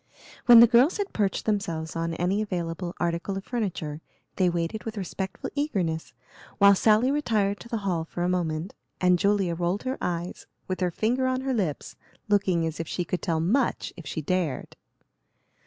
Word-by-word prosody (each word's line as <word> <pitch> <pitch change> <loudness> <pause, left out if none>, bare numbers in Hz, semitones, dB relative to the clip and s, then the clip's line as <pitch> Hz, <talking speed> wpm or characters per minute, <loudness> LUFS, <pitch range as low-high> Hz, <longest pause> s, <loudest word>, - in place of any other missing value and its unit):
When 240 -2 +10
the - - +11
girls 245 +7 +4
had 405 -1 -3
perched 200 -3 0
themselves 170 -7 -2
on 165 0 -2
any 185 +5 0
available 175 -3 -3
article 175 +3 -1
of 195 - -5
furniture, 175 -10 -3 0.4
they 185 -2 +3
waited 170 +5 -2
with 225 -1 -6
respectful 190 0 -5
eagerness, 190 - -1 0.5
while 200 -1 +7
Sally 220 +6 +4
retired 215 -9 0
to 235 - -12
the 230 - -1
hall 175 -4 0
for 175 +2 -4
a - - +1
moment, 175 -1 -1 0.3
and 180 -1 +4
Julia 200 -3 +2
rolled 175 +4 -1
her 260 +1 -3
eyes, 175 0 -4 0.2
with 185 - -3
her 180 -1 +1
finger 240 +9 0
on 255 0 0
her 265 0 -1
lips, 185 - -2 0.3
looking 190 -5 +2
as 160 0 -4
if 165 - -3
she 180 - -2
could 180 - -3
tell 165 -4 0
much 235 +11 0
if 170 - -10
she 155 - -4
dared. 170 -5 -2
185 Hz, 180 wpm, -26 LUFS, 170-215 Hz, 0.5 s, the